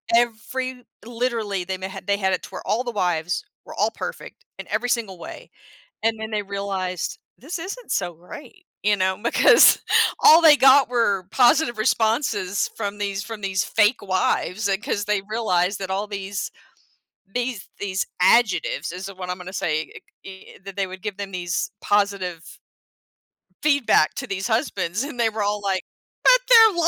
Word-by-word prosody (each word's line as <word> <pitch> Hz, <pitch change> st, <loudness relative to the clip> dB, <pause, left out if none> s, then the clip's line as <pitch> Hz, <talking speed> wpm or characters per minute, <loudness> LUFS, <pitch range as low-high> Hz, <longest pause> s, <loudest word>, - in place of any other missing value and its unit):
every 250 Hz, +2 st, -1 dB, 0.2 s
literally, 230 Hz, -5 st, -2 dB
they 190 Hz, +2 st, -4 dB
n 185 Hz, -, -12 dB
had 190 Hz, -, -9 dB
they 200 Hz, +1 st, +1 dB
had 190 Hz, -2 st, 0 dB
it 180 Hz, -, -2 dB
to -, -, -9 dB
where -, -, -7 dB
all 230 Hz, +4 st, 0 dB
the 245 Hz, -, -4 dB
wives 180 Hz, -, -1 dB, 0.2 s
were -, -, -10 dB
all -, -, +1 dB
perfect -, -, -8 dB
in -, -, -8 dB
every 245 Hz, -, -1 dB
single 220 Hz, -7 st, -1 dB
way, -, -, -10 dB, 0.5 s
and 225 Hz, 0 st, +1 dB
then 220 Hz, 0 st, -6 dB
they 210 Hz, -1 st, 0 dB
realized, 195 Hz, -3 st, -4 dB, 0.2 s
"This 325 Hz, +7 st, -6 dB
isn't 400 Hz, +8 st, -7 dB
so 175 Hz, -1 st, -1 dB
great," 295 Hz, -, -13 dB, 0.2 s
you 205 Hz, 0 st, +3 dB
know, 190 Hz, -1 st, 0 dB
because 235 Hz, -, +6 dB, 0.4 s
all 320 Hz, +2 st, +8 dB
they 315 Hz, -3 st, +8 dB
got 270 Hz, 0 st, +6 dB
were 205 Hz, -6 st, +1 dB
positive 245 Hz, 0 st, +3 dB
responses 220 Hz, -3 st, 0 dB
from 205 Hz, -2 st, -4 dB
these 200 Hz, -1 st, -2 dB
from 225 Hz, -1 st, -8 dB
these 190 Hz, -1 st, 0 dB
fake 210 Hz, +4 st, +2 dB
wives, 190 Hz, +1 st, 0 dB
uh, 195 Hz, -1 st, +1 dB
'cause 205 Hz, -6 st, -2 dB
they 210 Hz, -1 st, 0 dB
realized 200 Hz, -4 st, 0 dB
that 190 Hz, -1 st, -5 dB
all 200 Hz, +2 st, -2 dB
these 200 Hz, -1 st, -5 dB, 0.8 s
these 245 Hz, -4 st, -3 dB
these 190 Hz, -1 st, -2 dB
adjectives 245 Hz, -, +2 dB
is 185 Hz, +3 st, -6 dB
what 185 Hz, -2 st, -8 dB
I'm 180 Hz, -, -3 dB
gonna 180 Hz, 0 st, -9 dB
say, 155 Hz, -4 st, -1 dB
i -, -, -10 dB, 0.3 s
eh 190 Hz, -1 st, -12 dB
that 195 Hz, -1 st, -9 dB
they 195 Hz, -1 st, 0 dB
would 185 Hz, 0 st, -10 dB
give 210 Hz, -2 st, -5 dB
them 200 Hz, -1 st, -5 dB
these 175 Hz, -2 st, -2 dB
positive 200 Hz, -5 st, -1 dB, 1.1 s
feedback 280 Hz, -, +3 dB
to -, -, -5 dB
these 195 Hz, 0 st, -3 dB
husbands, 220 Hz, -, -1 dB
and 280 Hz, -3 st, -7 dB
they 230 Hz, -1 st, +3 dB
were 220 Hz, 0 st, -4 dB
all 205 Hz, 0 st, -1 dB
like, 190 Hz, -1 st, -1 dB, 0.4 s
"But, -, -, +6 dB
they're 450 Hz, -3 st, +8 dB
205 Hz, 175 wpm, -23 LUFS, 190-240 Hz, 1.1 s, all